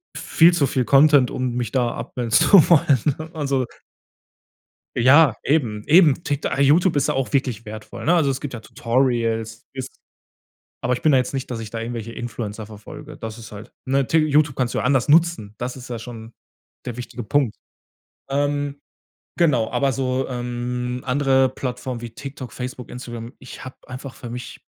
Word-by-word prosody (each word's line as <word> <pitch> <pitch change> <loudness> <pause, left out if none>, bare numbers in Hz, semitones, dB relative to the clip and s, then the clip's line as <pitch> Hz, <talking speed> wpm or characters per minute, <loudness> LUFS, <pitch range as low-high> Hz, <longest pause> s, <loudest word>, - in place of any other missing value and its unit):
viel 170 +2 +4
zu 155 -5 +2
viel 130 -1 0
Content, 140 -1 +5
um 130 -1 -2
mich 120 -3 -3
da 120 -2 +1
abmelden 115 0 -5
zu 180 - +6
wollen, 150 0 +2
also. 140 -4 0 1.3
Ja, 130 +2 +6
eben, 120 -8 0
eben. 160 -1 +5
Tik 145 -1 -2
YouTube 155 +5 +4
ist - - +1
ja - - +1
auch 135 -1 -2
wirklich 125 -5 0
wertvoll, 110 0 -8
ne? 170 - +4
Also, 155 -5 +3
es 130 - -2
gibt 145 - -5
ja 115 - -6
Tutorials, 115 -2 -1
ist 130 -1 -7 0.8
aber 125 +1 +1
ich 120 - -3
bin 155 - +4
ja 135 - +6
jetzt 125 - -1
nicht, 135 -1 -4
dass 120 - -3
ich 110 -1 -7
da 115 - -4
irgendwelche 115 -1 -5
Influencer 110 -3 -5
verfolge. 110 +8 -11
Das 110 0 -7
ist 110 - -11
halt, 105 +1 -11
ne, 135 0 +1
T 165 - +2
YouTube 150 -2 +2
kannst 125 -2 -1
du - - -2
ja - - 0
anders 135 0 +2
nutzen. 160 -10 +3
Das 125 +1 -4
ist 130 -1 -10
ja 120 -2 -4
schon 115 -1 -9 0.5
der 125 - -5
wichtige 125 -1 -7
Punkt. 125 0 +1 0.7
Ähm, 145 0 -1 0.6
genau, 135 -10 +2
aber 140 -1 +1
so, 130 0 -1
ähm, 125 0 -3
andere 135 0 +3
Plattformen 125 -1 -5
wie 120 -1 -7
TikTok, 130 -1 -8
Facebook, 125 +1 -7
Instagram, 120 -1 -7
ich 130 - -10
habe 130 - -9
einfach 130 +1 -8
für 120 - -9
mich 125 +1 -7
130 Hz, 180 wpm, -22 LUFS, 120-140 Hz, 1.3 s, zu